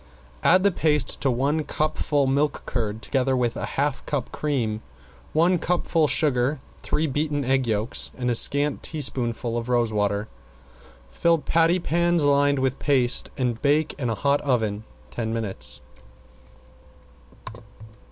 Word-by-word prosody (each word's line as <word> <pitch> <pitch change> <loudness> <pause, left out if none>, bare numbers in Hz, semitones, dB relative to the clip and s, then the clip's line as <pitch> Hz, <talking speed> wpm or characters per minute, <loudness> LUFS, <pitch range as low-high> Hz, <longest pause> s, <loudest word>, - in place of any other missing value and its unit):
Add 185 +2 +4
the 200 - +4
paste 150 -4 +1
to 135 - +1
one 140 +5 0
cupful 150 -1 0
milk 140 +2 0
curd, 110 -2 -3
together 130 -1 0
with 120 -2 0
a - - -4
half 145 0 0
cup 140 -5 -3
cream, 120 -8 -2 0.5
one 170 +3 +3
cupful 165 -2 +1
sugar, 140 -2 +1 0.2
three 155 - -1
beaten 145 -1 -1
egg 130 -1 +1
yolks 110 +3 -1
and 125 -1 -3
a 120 - +2
scant 145 +5 +3
teaspoonful 120 -6 -1
of 115 +1 -7
rose 120 -3 +1
water. 105 0 0 0.8
Fill 170 - +2
patty 165 +3 +2
pans 170 -1 +1
lined 145 0 +3
with 130 0 -1
paste 130 -4 +2
and 120 -3 -1
bake 150 +2 +2
in 125 -4 -1
hot 140 +6 +1
oven 110 -6 -1 0.3
ten 110 +11 -3
minutes. 95 - -4
135 Hz, 135 wpm, -24 LUFS, 120-150 Hz, 0.8 s, Add